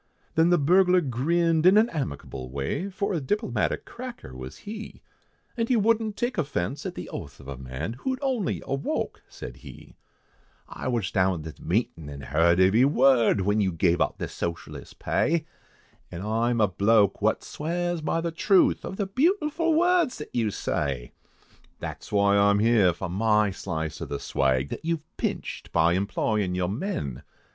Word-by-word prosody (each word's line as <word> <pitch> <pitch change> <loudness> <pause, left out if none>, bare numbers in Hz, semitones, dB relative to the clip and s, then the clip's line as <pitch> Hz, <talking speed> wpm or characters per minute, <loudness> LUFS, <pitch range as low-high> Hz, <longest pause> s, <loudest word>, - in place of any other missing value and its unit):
Then 165 +1 +4
the 175 - +5
burglar 180 +4 +4
grinned 165 +5 +2
in 190 +3 +7
an 220 +2 +5
amicable 70 - -5
way, 70 - -3
For 200 +1 -2
a 170 - 0
diplomatic 210 - -1
cracker 240 - -9
was 65 0 -8
he, 215 +1 -9 0.5
And 230 -1 -1
he 255 - +4
wouldn't 220 -1 +1
take 240 -5 -1
offence 135 - -2
at - - -6
the - - -6
oath 70 -1 -8
of 70 - -13
a 70 - -5
man, 65 - -5
Who - - -3
had 260 -1 -1
only 250 -9 -1
awoke, 135 +1 -2
said - - -9
he, - - -13 0.7
"I - - -6
was 115 -7 -1
down 95 -4 +1
at 80 - -7
the - - -20
meetin' 85 -5 -1
an' 70 -1 -8
heerd 85 +5 +2
every 95 +6 +5
word, 130 -6 +4
When 105 +3 +1
you 95 -2 +1
gave 85 +1 +1
out - - 0
the - - -3
socialist 85 0 -6
pay, 160 -1 0 0.7
An' 85 0 -6
I 115 +3 +1
am 120 -1 0
a 105 - +5
bloke 100 +2 +3
wot - - +1
swears 175 +2 -2
by 165 +2 0
the 170 0 -2
truth 190 +3 +3
Of 190 - -6
the 200 - 0
beautiful 320 - +1
words 350 -4 +3
that 150 - -9
you 115 -3 +1
say. 70 -10 -2 0.7
That's - - -7
whoy 100 0 +3
I 100 - +5
am 100 - +4
here, 105 -4 +4
for 90 +3 -5
my 105 +2 +2
slice 80 -5 -4
of - - -5
the 70 - -3
swag, 65 0 0
That - - -6
you've 160 -1 -3
pinched, - - -4
by 85 +1 +3
employin' 100 0 0
your 90 -1 0
men. 105 - -3
115 Hz, 180 wpm, -26 LUFS, -, 0.7 s, in